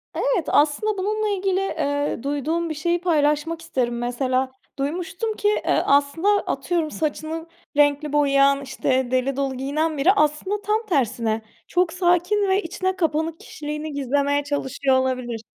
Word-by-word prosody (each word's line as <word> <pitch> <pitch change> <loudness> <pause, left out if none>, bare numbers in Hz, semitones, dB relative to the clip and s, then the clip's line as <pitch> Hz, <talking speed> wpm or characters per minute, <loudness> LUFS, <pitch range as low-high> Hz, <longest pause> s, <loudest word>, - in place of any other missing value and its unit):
Evet, - - +1
aslında 310 +9 +2
bununla 425 +3 -1
ilgili, 385 -1 0
eee, 285 -9 -1
duyduğum 300 +4 -1
bir - - -2
şeyi 340 +3 0
paylaşmak 315 -1 +1
isterim. 240 -6 -1
Mesela 255 +2 -1 0.3
duymuştum 360 +9 -2
ki, 415 - -1
eee, 420 - +2
aslında 285 +6 +2
atıyorum 350 -5 0
saçını 315 +1 -3 0.3
renkli 290 0 +3
boyayan, 275 -1 +4
işte, 260 -2 -1
deli 255 +1 +1
dolu 275 -1 -1
giyinen 300 +4 -1
biri 295 +7 +5
aslında 380 +4 +1
tam 425 +2 0
tersine; 230 - 0 0.3
çok 355 -2 +1
sakin 360 +3 +2
ve 385 +2 +3
içine 375 +3 -2
kapanık 325 -2 -1
kişiliğini 300 0 -6
gizlemeye 285 +1 +1
çalışıyor 280 -2 0
olabilir. 255 -3 -2
300 Hz, 140 wpm, -23 LUFS, 275-355 Hz, 0.3 s, biri